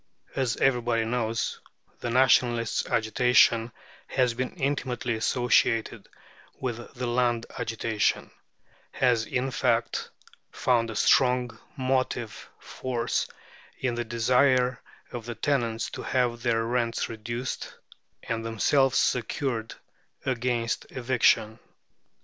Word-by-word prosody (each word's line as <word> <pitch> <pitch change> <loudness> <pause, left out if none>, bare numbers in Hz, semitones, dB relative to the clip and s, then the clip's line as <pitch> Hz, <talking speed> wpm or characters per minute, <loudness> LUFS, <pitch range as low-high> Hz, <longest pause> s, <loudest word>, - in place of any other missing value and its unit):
As 130 -3 0
everybody 120 -3 +2
knows, 115 -1 -1 0.4
the 120 - -3
Nationalist 120 -2 +3
agitation 115 +1 +3 0.4
has 125 -3 +1
been 125 +2 -4
intimately 130 -5 -1
associated 115 0 +1 0.5
with 125 -3 -2 0.2
the 125 0 -3
Land 120 -1 +1
agitation 115 -2 -1 0.6
has, 120 -3 +2
in 130 +1 -1
fact, 120 -2 0 0.4
found 120 -2 +1
a 110 - -6
strong 125 -1 +3 0.2
motive 130 -3 -2
force 120 -3 -2 0.5
in 130 -2 -1
the 120 0 -2
desire 125 +2 +2 0.3
of 120 -2 -7
the 120 - -4
tenants 115 -3 -1
to - - -6
have 120 -2 0
their 115 -2 +1
rents 115 -1 0
reduced, 120 +3 -5 0.5
and 115 -1 -3
themselves 130 +4 +2
secured 120 -1 -1 0.5
against 120 -2 -1
eviction. 120 -3 +2
120 Hz, 105 wpm, -27 LUFS, 115-125 Hz, 0.6 s, Nationalist